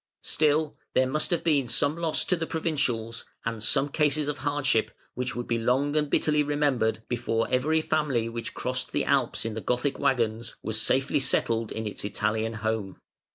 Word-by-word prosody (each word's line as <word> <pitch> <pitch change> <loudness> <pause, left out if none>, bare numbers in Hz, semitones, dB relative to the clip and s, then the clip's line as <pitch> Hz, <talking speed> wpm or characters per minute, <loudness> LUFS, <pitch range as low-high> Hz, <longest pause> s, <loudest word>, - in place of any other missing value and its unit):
Still 150 +1 +1 0.2
there 130 - +5
must 150 +4 -1
have 175 -3 0
been 145 -6 +2
some 145 +5 +2
loss 165 -2 0
to 180 - +2
the 165 -1 -3
provincials 125 -9 -1 0.2
and 115 -1 -3
some 135 +6 +2
cases 150 0 +1
of 145 -1 -2
hardship 145 -5 +1 0.2
which 125 0 -3
would 120 0 -3
be 115 -1 0
long 135 +5 +1
and 150 -1 +1
bitterly 150 0 +2
remembered, 145 -7 +1
before 115 -2 0
every 150 +5 +2
family 150 -8 0
which 115 0 -6
crossed - - -2
the - - +1
Alps - - +1
in 115 - -2
the 110 - -4
Gothic 125 +4 -1
waggons 115 -2 0
was 110 0 0
safely 135 +5 +2
settled 115 -4 +1
in 110 - -4
its 105 - -4
Italian 110 +3 -1
home. 110 -4 -2
130 Hz, 180 wpm, -27 LUFS, 115-150 Hz, 0.2 s, there